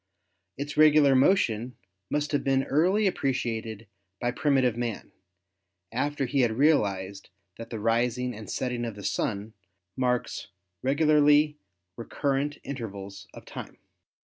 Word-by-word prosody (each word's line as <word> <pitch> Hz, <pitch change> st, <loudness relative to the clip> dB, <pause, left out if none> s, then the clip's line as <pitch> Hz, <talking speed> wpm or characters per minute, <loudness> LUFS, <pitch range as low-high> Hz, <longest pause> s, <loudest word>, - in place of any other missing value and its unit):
Its 145 Hz, +2 st, -5 dB
regular 150 Hz, -2 st, +6 dB
motion 130 Hz, -, +2 dB, 0.3 s
must 150 Hz, 0 st, -1 dB
have 145 Hz, -, 0 dB
been 135 Hz, -1 st, +2 dB
early 185 Hz, +11 st, +2 dB
appreciated 115 Hz, -, -2 dB, 0.3 s
by 120 Hz, 0 st, 0 dB
primitive 130 Hz, -3 st, +2 dB
man, 120 Hz, -3 st, -4 dB, 0.8 s
after 140 Hz, +3 st, -1 dB
he 135 Hz, +2 st, +1 dB
had 120 Hz, -3 st, +2 dB
realized 100 Hz, -10 st, +1 dB, 0.3 s
that 115 Hz, 0 st, -8 dB
the 115 Hz, -, -5 dB
rising 120 Hz, +3 st, 0 dB
and 110 Hz, -1 st, -9 dB
setting 125 Hz, -2 st, -2 dB
of 115 Hz, -3 st, -4 dB
the 100 Hz, -, -10 dB
Sun 105 Hz, +2 st, -2 dB, 0.4 s
marks 125 Hz, -1 st, -1 dB, 0.3 s
regularly 150 Hz, +1 st, +4 dB, 0.4 s
recurrent 140 Hz, +4 st, -1 dB
intervals 100 Hz, -7 st, -7 dB
of -, -, -11 dB
time. -, -, -9 dB
125 Hz, 120 wpm, -27 LUFS, 115-145 Hz, 0.8 s, regular